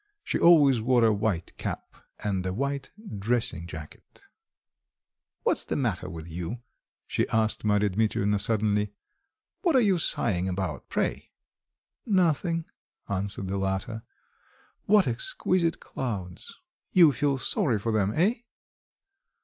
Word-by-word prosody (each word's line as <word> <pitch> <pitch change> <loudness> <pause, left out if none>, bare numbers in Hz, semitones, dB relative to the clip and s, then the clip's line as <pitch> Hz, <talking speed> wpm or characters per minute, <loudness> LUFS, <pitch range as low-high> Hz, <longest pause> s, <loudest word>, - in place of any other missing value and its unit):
She - - -1
always 145 -8 +6
wore 120 0 +4
a 110 - +4
white 100 -5 -2
cap - - -5 0.3
and 95 -3 -1
a 95 - -2
white 140 +3 -2 0.3
dressing 110 -6 0
jacket. 80 -2 -11 1.2
"What's - - +2
the - - -3
matter 110 -10 -1
with 80 -2 -8
you?" 85 +7 -5 0.5
she - - -1
asked 110 -1 +1
Marya 105 -1 +2
Dmitrievna 105 0 +1
suddenly. 105 -1 +1 0.7
"What 340 -5 +2
are - - +7
you 200 -7 +3
sighing 95 - +1
about, 90 -4 -4
pray?" - - -2 0.8
"Nothing," 170 -4 +2 0.4
answered 100 0 -2
the 100 +1 -2
latter. 95 +3 -2 0.9
"What 205 -4 +5
exquisite 165 +8 0
clouds!" 95 -9 -5 0.4
"You 170 -5 +7
feel 140 +2 0
sorry 135 - +1
for 115 +3 -2
them, 105 -2 +1
eh?" 210 +8 +2
110 Hz, 125 wpm, -27 LUFS, 95-140 Hz, 1.2 s, are